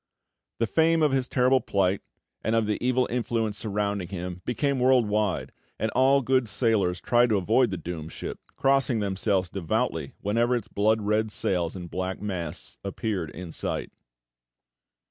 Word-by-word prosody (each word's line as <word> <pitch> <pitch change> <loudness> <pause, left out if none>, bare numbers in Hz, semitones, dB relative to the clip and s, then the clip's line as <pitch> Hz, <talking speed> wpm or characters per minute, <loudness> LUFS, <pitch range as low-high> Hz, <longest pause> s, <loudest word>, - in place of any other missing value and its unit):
The 115 - +1
fame 160 +6 +3
of 150 - +4
his 130 -2 +1
terrible 130 0 +3
plight, 95 -1 +1 0.4
and 110 +2 +1
of 115 -1 +2
the 105 +2 -2
evil 125 0 +2
influence 115 -3 -1
surrounding 100 -3 -2
him, 90 -1 -5
became 140 +2 0
world 125 -2 +4
wide, 105 -2 0 0.3
and 110 - -1
all 135 +2 +4
good 130 -2 +2
sailors 100 -5 +1
tried 120 +3 +3
to 105 - +3
avoid 110 +6 +3
the 95 - -3
doomed 80 -1 -6
ship, - - -6 0.2
crossing 135 -3 +2
themselves 95 -1 0
devoutly 90 -3 -2
whenever 115 +4 +2
its 115 -3 -3
blood 110 +1 +1
red 105 +1 +1
sails 90 -4 0
and 90 -2 -7
black 95 0 -3
masts 90 -6 -5
appeared 100 -4 -3
in 85 +2 -8
sight. - - -3
105 Hz, 160 wpm, -26 LUFS, 95-125 Hz, 0.4 s, of